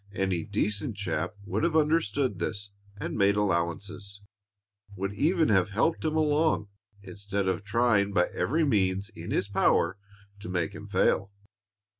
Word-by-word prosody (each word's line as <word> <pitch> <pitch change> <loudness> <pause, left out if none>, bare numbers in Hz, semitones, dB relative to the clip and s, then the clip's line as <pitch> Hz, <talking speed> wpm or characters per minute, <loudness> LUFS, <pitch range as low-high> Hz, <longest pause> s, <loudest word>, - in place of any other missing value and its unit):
Any 95 -3 0
decent 105 0 -2
chap 90 -1 -2
would - - -2
have 170 -1 +1
understood 145 - +1
this 100 +3 -4 0.3
and - - -4
made 100 -1 +3
allowances, 100 +1 -2 0.8
would 100 +1 -3
even 160 - +2
have 95 -2 +3
helped 115 +12 0
him 155 -1 0
along 155 -7 +2 0.3
instead 100 0 -3
of 95 +1 -1
trying 105 -1 +2
by 90 -3 +3
every 160 +5 +1
means 100 -6 +1
in 85 -6 -9
his - - 0
power 95 -1 +2 0.4
to 100 - -8
make 90 -3 -1
him - - -9
fail. 100 +1 +1
100 Hz, 145 wpm, -28 LUFS, 95-115 Hz, 0.8 s, made